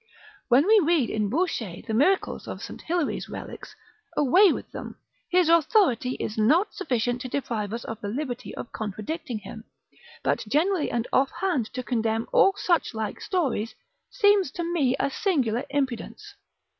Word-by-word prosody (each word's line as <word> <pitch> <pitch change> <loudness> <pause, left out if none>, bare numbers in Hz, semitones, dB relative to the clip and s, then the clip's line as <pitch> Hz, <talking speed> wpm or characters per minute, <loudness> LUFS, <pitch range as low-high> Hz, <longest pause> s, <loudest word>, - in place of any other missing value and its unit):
When 260 +4 +5
we 430 +1 +6
read 310 -7 +2
in 215 -2 0
Bouchet 235 - -2
the 220 - -3
miracles 305 - +1
of - - -6
St. - - -8
Hilary's 340 -2 -2
relics, - - -8 0.4
away 350 +7 +6
with - - -5
them: - - -8 0.3
his 360 -2 +3
authority 325 - +3
is 220 -3 -4
not 320 - +3
sufficient 245 - -1
to 255 - -4
deprive 225 -7 -2
us 230 +1 -4
of 225 0 -7
the 205 - -4
liberty 245 +2 -4
of - - -7
contradicting 220 - -4
him; 220 +2 -9 0.6
but - - +1
generally 325 - +2
and 235 0 -2
offhand 280 - +1
to 255 - -4
condemn 225 -2 0
all 390 - +6
suchlike 235 - -1
stories, 265 - -1 0.3
seems 410 - +3
to 345 - -3
me 320 -7 +1
a 275 - 0
singular 265 - 0
impudence. 285 - -3
270 Hz, 155 wpm, -26 LUFS, 230-345 Hz, 0.6 s, we